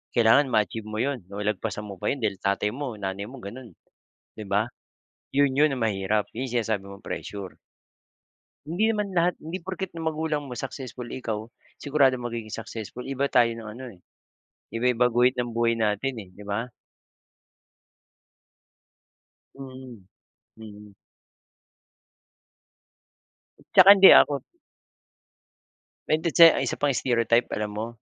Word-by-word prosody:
kailangan 120 +5 +5
ma-achieve 110 -2 -1
mo 110 - -6
'yon 130 -10 -3
o 100 +1 -6
lagpasan 105 0 -3
mo 100 -3 -9
pa - - -3
'yon 135 -4 -2
dahil 100 -3 -1
tatay 100 +1 0
mo 130 -2 -5
nanay 100 0 -5
mo 130 -2 -11
gano'n. 115 -1 -10 0.6
'Di 105 - -7
ba? 105 +4 0 0.7
'Yon 140 -1 +4
'yon 150 -3 +4
ang 120 - -2
mahirap, 105 0 0
'yong 125 +1 -5
sinasabi 110 -4 -1
mong 100 0 -12
pressure. 100 -3 -7 1.1
Hindi 180 +9 0
naman 210 -3 -1
lahat, 175 0 +2
hindi 170 +3 -5
porket 190 +1 -5
ang 165 -1 -3
magulang 155 -2 -3
mo 125 - -7
successful, 130 -1 -6
eh 130 - -5
ikaw 110 -2 -3 0.3
siguradong 135 -4 +1
magiging 115 -2 -5
successful, 115 +2 -7
iba 135 +1 -1
tayo 120 -2 +3
ng 115 -1 -8
ano 130 -3 -8
eh, 90 - -20 0.7
iba-iba 125 +1 +1
guhit 125 +2 +3
ng 120 -1 -2
buhay 115 0 +1
natin 110 +4 -1
eh, 90 - -16
di 100 +2 -14
ba? 115 +5 -3 2.9
Mm, 130 -5 -10 0.6
mm. 105 -2 -12 2.8
Tsaka 195 0 +9
hindi 195 0 +9
ako 140 -2 +5 1.6
Bente 155 +2 +1
che 165 -1 +10
ang - - -1
isa - - -2
pang 145 -1 +1
stereotype, 115 -1 +1
alam 105 0 -3
mo, 110 - -2
120 Hz, 140 wpm, -25 LUFS, 105-135 Hz, 2.9 s, che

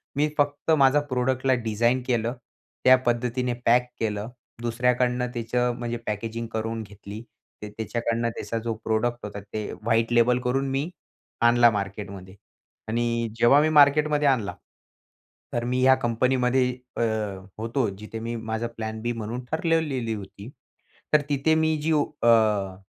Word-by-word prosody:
मी 150 +2 +2
फक्त 145 +2 0
माझा 140 +1 +5
प्रोडक्टला 130 +1 +1
डिझाईन 120 +3 +1
केलं 120 -1 0 0.5
त्या 130 0 +9
पद्धतीने 120 +1 0
पॅक 125 +1 +4
केलं, 105 0 -2 0.3
दुसऱ्याकडनं 125 +1 +1
त्याचं, 120 +1 0
म्हणजे 120 0 -3
पॅकेजिंग 115 +2 -3
करून 110 0 -2
घेतली 105 +1 -10 0.4
ते 105 - -6
त्याच्याकडनं 115 +2 -2
त्याचा 115 0 -5
जो 115 -1 -1
प्रोडक्ट 120 +2 -1
होता 100 0 -6
ते 105 +1 -5
व्हाईट 115 +1 +1
लेबल 120 +1 +4
करून 135 +2 0
मी 140 +5 -1 0.5
आणला 120 0 +6
मार्केटमध्ये. 100 -1 -5 0.5
आणि 115 0 0
जेव्हा 120 +5 +6
मी 155 - +2
मार्केटमध्ये 150 0 +4
आणला 115 -7 +1 1.0
तर 120 - -1
मी 125 +1 0
ह्या 130 0 +7
कंपनीमध्ये 125 +1 +1 0.3
अ, - - 0 0.6
होतो, 115 +1 0
जिथे 105 +3 -8
मी 115 +1 -4
माझा 110 +1 -3
प्लॅन 110 0 -4
बी 120 +1 -1
म्हणून 115 +2 -5
ठरवलेली 160 -8 0
होती. 100 +2 -9 0.6
तर 150 - +6
तिथे 145 +3 +2
मी 160 0 +2
जी 160 +2 0
अ, 110 -10 +2
120 Hz, 140 wpm, -25 LUFS, 110-130 Hz, 1.0 s, त्या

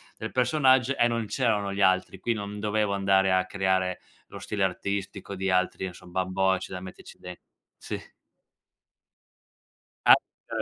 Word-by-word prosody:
del 110 - -6
personaggio 130 -1 +3
e - - +3
non 115 -1 -1
c'erano 105 -4 0
gli 100 - -2
altri. 95 0 +2
Qui 120 - -1
non 105 -2 -4
dovevo 105 -1 0
andare 95 -1 +3
a 95 0 +2
creare 95 -1 0 0.3
lo - - -10
stile 105 -2 -2
artistico 100 +1 -3
di 95 0 -2
altri 95 0 +1
insomma, 90 +1 -4
bambocci 95 0 0
da 90 - -5
metterci 95 0 -11
den 90 0 -8 0.4
sì. - - -6 2.1
Ah - - +10
è - - -8
95 Hz, 145 wpm, -27 LUFS, 95-105 Hz, 2.1 s, Ah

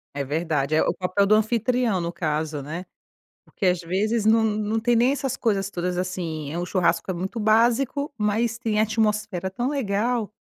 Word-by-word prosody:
É 140 - -1
verdade, 150 0 -1
eh, - - +4
o - - +1
papel 185 +2 +1
do 215 - +5
anfitrião 225 -2 +1
no 170 0 -3
caso, 155 -3 -2
né. 165 +5 -6 0.6
Porque 195 - -5
às 180 -1 +3
vezes 205 +6 0
não 225 +1 +5
não 215 0 0
tem 240 +1 +2
nem 245 +4 +4
essas 275 -3 -2
coisas 200 -4 0
todas, 180 -1 -3
assim, 165 -5 -3
é - - -3
um 175 - -2
churrasco 170 -1 0
é - - -2
muito 190 +6 -4
básico, 240 +7 +2
mas 220 +2 0
tem 220 -3 -1
atmosfera 210 -4 0
tão 240 +6 -2
legal. 230 -3 -1
205 Hz, 185 wpm, -24 LUFS, 175-225 Hz, 0.6 s, do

